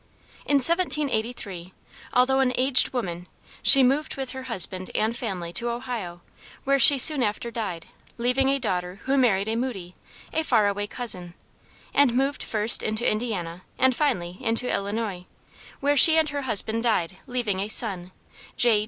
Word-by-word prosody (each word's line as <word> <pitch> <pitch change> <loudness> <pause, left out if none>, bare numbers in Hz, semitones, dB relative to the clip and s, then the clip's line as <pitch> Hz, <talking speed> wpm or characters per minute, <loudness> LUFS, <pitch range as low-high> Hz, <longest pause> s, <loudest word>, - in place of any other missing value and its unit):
In 285 - +1
1783, 245 - +2 0.4
although 260 +2 +1
an 255 -1 0
aged 255 0 +2
woman, 180 -8 -6 0.3
she 275 -1 +8
moved 275 +4 -1
with 265 -2 -6
her 265 - -8
husband 185 -3 -2
and 220 +2 -1
family 185 -8 -6
to 235 +6 0
Ohio, 235 -8 -7 0.4
where 275 0 0
she 280 +3 +7
soon 285 +1 +7
after 235 +2 -3
died, 195 -8 -6 0.3
leaving 250 +3 0
a 275 - +1
daughter 185 -5 -5
who 270 +1 -1
married 215 -7 +1
a 220 - -2
Moody, 220 -8 -6 0.4
a 320 - -1
far 225 -8 +1
away 205 0 -3
cousin, 185 -7 -3 0.6
and 275 -4 +2
moved 275 +2 -2
first 215 +1 +5
into 215 +2 -2
Indiana 190 -7 -4 0.2
and 260 -1 +1
finally 180 - -3
into 230 0 -2
Illinois, 200 -3 -5 0.5
where 285 +1 0
she 320 +3 +7
and 315 -1 +1
her 290 -1 -5
husband 225 -2 -2
died 190 -6 -2
leaving 235 -6 -3
a 200 - -3
son, 190 -5 -1 0.5
J. 235 -3 +3
230 Hz, 160 wpm, -23 LUFS, 195-265 Hz, 0.6 s, she